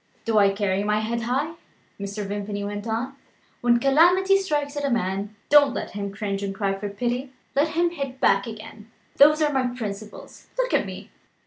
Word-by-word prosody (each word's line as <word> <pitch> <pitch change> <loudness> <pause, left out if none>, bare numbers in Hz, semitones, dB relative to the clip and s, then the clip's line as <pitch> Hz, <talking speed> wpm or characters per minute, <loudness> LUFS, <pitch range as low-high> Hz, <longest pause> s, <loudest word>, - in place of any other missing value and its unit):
"Do 225 -2 +3
I 200 -1 +6
carry 195 -1 0
my 210 +1 +1
head 230 +2 -2
high?" 265 +7 -1 0.5
Mr. 200 +1 -4
Vimpany 205 0 -4
went 205 +2 -5
on. 240 +5 -2 0.5
"When 240 0 +4
calamity 350 +9 +5
strikes 295 -6 -2
at 290 - -3
a 280 - +1
man, 200 -2 -1
don't 285 -3 +6
let - - -4
him 200 0 -4
cringe 200 -1 -3
and 195 -1 -3
cry 195 -1 0
for 200 +1 -4
pity 245 +5 -3 0.2
let 285 +3 +3
him 345 0 +3
hit 275 -5 -5
back 195 -3 +3
again! 220 0 -10 0.3
Those 305 +2 +6
are 295 -1 +1
my 255 -2 0
principles. 210 -2 -7
Look - - 0
at - - +2
me. - - -9
230 Hz, 190 wpm, -24 LUFS, 205-280 Hz, 0.5 s, I